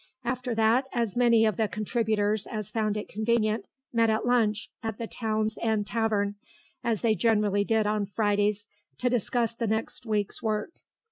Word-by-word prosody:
After 245 Hz, 0 st, -2 dB
that 225 Hz, +4 st, +3 dB
as 235 Hz, -5 st, -1 dB
many 235 Hz, -2 st, +5 dB
of 215 Hz, -4 st, +1 dB
the 220 Hz, -, +2 dB
contributors 215 Hz, -1 st, 0 dB
as 215 Hz, -3 st, -5 dB
found 215 Hz, -2 st, 0 dB
it 210 Hz, -, -4 dB
convenient 220 Hz, 0 st, 0 dB, 0.3 s
met 230 Hz, -1 st, +3 dB
at 220 Hz, +1 st, +1 dB
lunch 225 Hz, -4 st, +1 dB
at 225 Hz, -2 st, -4 dB
the 230 Hz, -, -4 dB
Town's 220 Hz, -1 st, -2 dB
End 220 Hz, -2 st, +1 dB
Tavern, 210 Hz, -2 st, 0 dB, 0.5 s
as 225 Hz, -3 st, 0 dB
they 230 Hz, -2 st, +3 dB
generally 210 Hz, -2 st, +2 dB
did 220 Hz, 0 st, +1 dB
on 210 Hz, -1 st, 0 dB
Fridays, 205 Hz, 0 st, +1 dB, 0.3 s
to 250 Hz, 0 st, 0 dB
discuss 235 Hz, -1 st, 0 dB
the 230 Hz, 0 st, -2 dB
next 220 Hz, +2 st, -2 dB
week's 210 Hz, -2 st, -1 dB
work. 215 Hz, +4 st, -1 dB
220 Hz, 165 wpm, -27 LUFS, 210-230 Hz, 0.5 s, many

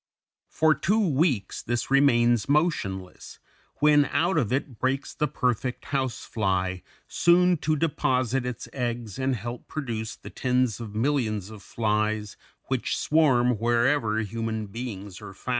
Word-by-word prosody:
For 155 Hz, 0 st, +3 dB
two 190 Hz, +9 st, +1 dB
weeks 135 Hz, -, 0 dB
this 120 Hz, +2 st, -3 dB
remains 120 Hz, -5 st, +4 dB
motionless, 120 Hz, -, -1 dB, 0.4 s
when 150 Hz, -1 st, +5 dB
out 165 Hz, +8 st, +1 dB
of 125 Hz, -9 st, +1 dB
it 130 Hz, -3 st, -2 dB
breaks 135 Hz, +2 st, -1 dB
the 150 Hz, -, 0 dB
perfect 125 Hz, -2 st, -2 dB
house 135 Hz, -4 st, -2 dB
fly, 95 Hz, -3 st, -1 dB, 0.3 s
soon 180 Hz, +1 st, +4 dB
to 155 Hz, +1 st, 0 dB
deposit 130 Hz, -5 st, 0 dB
its 125 Hz, -2 st, -5 dB
eggs 120 Hz, -4 st, -3 dB
and 130 Hz, 0 st, +1 dB
help 120 Hz, +3 st, -7 dB
to -, -, -18 dB
produce 115 Hz, -7 st, -4 dB
the -, -, -11 dB
tens 125 Hz, -3 st, 0 dB
of 110 Hz, -3 st, -7 dB
millions 110 Hz, -5 st, 0 dB
of 105 Hz, -2 st, -11 dB
flies 105 Hz, -1 st, -1 dB, 0.3 s
which 130 Hz, -2 st, -2 dB
swarm 125 Hz, -7 st, +3 dB
wherever 120 Hz, 0 st, +2 dB
human 110 Hz, +1 st, -3 dB
beings 100 Hz, -3 st, -7 dB
are 100 Hz, -2 st, -9 dB
found. 125 Hz, -, -9 dB
120 Hz, 140 wpm, -26 LUFS, 110-140 Hz, 0.4 s, when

